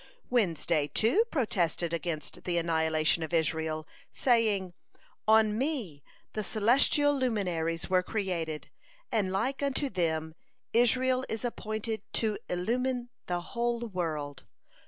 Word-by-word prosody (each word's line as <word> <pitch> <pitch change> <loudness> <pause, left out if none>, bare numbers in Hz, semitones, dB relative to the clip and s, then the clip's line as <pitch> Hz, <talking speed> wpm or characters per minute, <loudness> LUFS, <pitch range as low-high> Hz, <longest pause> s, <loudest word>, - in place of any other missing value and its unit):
Wednesday, 165 - +1
too, 280 - +3
protested 175 - 0
against 165 -3 -4
the 175 -1 +1
annihilation 160 -1 +2
of 160 +2 -2
Israel, 160 -1 0 0.2
saying: 215 -7 +2 0.5
"On 220 -1 +5
me 235 - -2 0.3
the 215 - -2
celestial 275 +7 +3
luminaries 180 -10 -1
were 185 -1 +3
created, 180 -6 -3 0.4
and 200 -4 +1
like 255 +9 -1
unto 280 0 -1
them 160 -4 -1 0.4
Israel 255 +2 +4
is 225 +2 -3
appointed 220 -2 -3
to 215 -2 0
illumine 245 +7 -1 0.2
the 175 -1 -1
whole 235 +5 -1
world. 160 - -4
195 Hz, 115 wpm, -30 LUFS, 165-240 Hz, 0.5 s, On